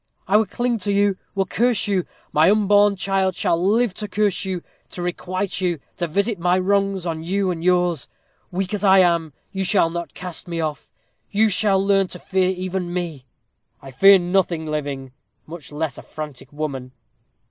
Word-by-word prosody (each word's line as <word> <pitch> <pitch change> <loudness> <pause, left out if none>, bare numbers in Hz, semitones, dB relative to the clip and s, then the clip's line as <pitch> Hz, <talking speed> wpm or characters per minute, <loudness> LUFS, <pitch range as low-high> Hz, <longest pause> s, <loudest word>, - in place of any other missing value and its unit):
I 195 - +2
will 215 0 +4
cling 240 +3 -1
to 205 +1 -2
you 200 -1 +2 0.2
will 195 -1 +1
curse 235 +4 +1
you. 190 -3 +1 0.3
My 155 +4 +5
unborn 205 0 +4
child 190 -1 0
shall 170 -1 +1
live 220 +2 +2
to 210 +3 -5
curse 205 -3 0
you 185 -2 -3 0.3
to - - -9
requite 180 +2 -3
you 175 -4 0 0.2
to 175 - -1
visit 200 +5 0
my 180 +1 +2
wrongs 195 0 +1
on 160 -2 -3
you 190 +2 0
and 165 -2 -5
yours. 180 -4 +2 0.4
Weak 185 +2 -3
as 205 -1 -2
I 195 -1 +6
am, 170 -4 +3 0.2
you 195 -1 -2
shall 185 -3 +2
not 170 -3 -5
cast 180 -2 -7
me 170 -1 -3
off. 155 -2 -4 0.4
You 215 +2 +3
shall 200 0 +2
learn 195 -1 +2
to 180 - -7
fear 185 +1 0
even 185 -1 -3
me." 165 -7 -4 0.5
"I 135 - -11
fear 195 +9 +7
nothing 175 -2 0
living, 145 -4 -4 0.3
much 160 -2 -10
less 150 -2 -3
a - - -9
frantic 150 -4 -8
woman." 140 -4 -5
185 Hz, 180 wpm, -22 LUFS, 165-195 Hz, 0.5 s, fear